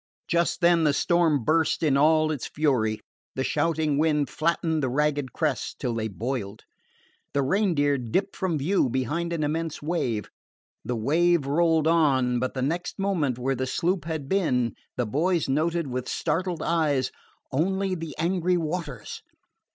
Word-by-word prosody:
Just 170 Hz, 0 st, +1 dB
then 170 Hz, -1 st, +4 dB
the 150 Hz, -2 st, +3 dB
storm 165 Hz, -6 st, +2 dB
burst 160 Hz, +4 st, +1 dB
in 145 Hz, -4 st, +3 dB
all 155 Hz, +2 st, +4 dB
its 145 Hz, -5 st, -3 dB
fury, 125 Hz, -8 st, 0 dB, 0.3 s
the 130 Hz, -, -1 dB
shouting 155 Hz, -1 st, 0 dB
wind 150 Hz, -4 st, +1 dB
flattening 165 Hz, 0 st, 0 dB
the 135 Hz, -3 st, 0 dB
ragged 145 Hz, 0 st, 0 dB
crests 150 Hz, -6 st, -2 dB
till 125 Hz, -3 st, -3 dB
they 110 Hz, -1 st, -2 dB
boiled. 110 Hz, -1 st, -4 dB, 0.7 s
The 140 Hz, -, +2 dB
Reindeer 145 Hz, -5 st, +2 dB
dipped 185 Hz, -, -1 dB
from 180 Hz, -4 st, -1 dB
view 150 Hz, 0 st, +1 dB
behind 150 Hz, +8 st, -1 dB
an 165 Hz, -2 st, -1 dB
immense 160 Hz, +1 st, -2 dB
wave. 140 Hz, -9 st, -2 dB, 0.5 s
The 125 Hz, -, -2 dB
wave 160 Hz, +7 st, +2 dB
rolled 160 Hz, +2 st, +2 dB
on, 135 Hz, -7 st, +3 dB
but 130 Hz, +2 st, -2 dB
the 130 Hz, -, -1 dB
next 170 Hz, +6 st, -2 dB
moment, 175 Hz, -, 0 dB
where 130 Hz, +2 st, 0 dB
the 130 Hz, 0 st, -2 dB
sloop 170 Hz, +4 st, -1 dB
had 160 Hz, -4 st, -4 dB
been, 130 Hz, -, +1 dB, 0.2 s
the 125 Hz, -, +1 dB
boys 165 Hz, -, 0 dB
noted 165 Hz, +4 st, 0 dB
with 125 Hz, -1 st, -4 dB
startled 180 Hz, -1 st, -1 dB
eyes 150 Hz, -6 st, +1 dB, 0.4 s
only 190 Hz, +6 st, 0 dB
the 165 Hz, -3 st, -5 dB
angry 180 Hz, +2 st, +1 dB
waters! 155 Hz, -7 st, -4 dB
155 Hz, 155 wpm, -26 LUFS, 130-170 Hz, 0.7 s, then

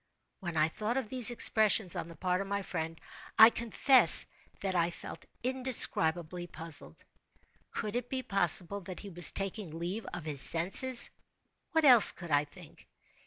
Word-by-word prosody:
When 170 Hz, -4 st, -8 dB
I 155 Hz, 0 st, +1 dB
thought 215 Hz, +9 st, -6 dB
of 255 Hz, -5 st, -6 dB
these 250 Hz, -2 st, +1 dB
expressions, 220 Hz, -5 st, 0 dB
on 170 Hz, -2 st, -7 dB
the 170 Hz, -, -14 dB
part 180 Hz, +3 st, -4 dB
of 195 Hz, -, -8 dB
my 200 Hz, 0 st, -5 dB
friend, 165 Hz, -3 st, -8 dB, 0.4 s
I 220 Hz, +1 st, +6 dB
confess 235 Hz, +4 st, +6 dB, 0.4 s
that 195 Hz, -1 st, -5 dB
I 170 Hz, -1 st, -2 dB
felt 170 Hz, -, -13 dB, 0.2 s
indescribably 180 Hz, -10 st, +1 dB
puzzled. 160 Hz, -, -5 dB, 0.7 s
Could 215 Hz, +1 st, -8 dB
it 245 Hz, 0 st, -6 dB
be 260 Hz, -1 st, -6 dB
possible 195 Hz, -1 st, 0 dB
that 185 Hz, 0 st, -11 dB
he 205 Hz, -, -12 dB
was 175 Hz, -1 st, +2 dB
taking 195 Hz, -4 st, -7 dB
leave 180 Hz, +6 st, -7 dB
of 170 Hz, -3 st, -10 dB
his 145 Hz, -4 st, +1 dB
senses? 195 Hz, -, +1 dB, 0.6 s
What 320 Hz, -1 st, 0 dB
else 245 Hz, -5 st, +7 dB
could 170 Hz, -3 st, -12 dB
I 145 Hz, 0 st, 0 dB
think? 145 Hz, -, -18 dB
190 Hz, 165 wpm, -28 LUFS, 170-230 Hz, 0.7 s, else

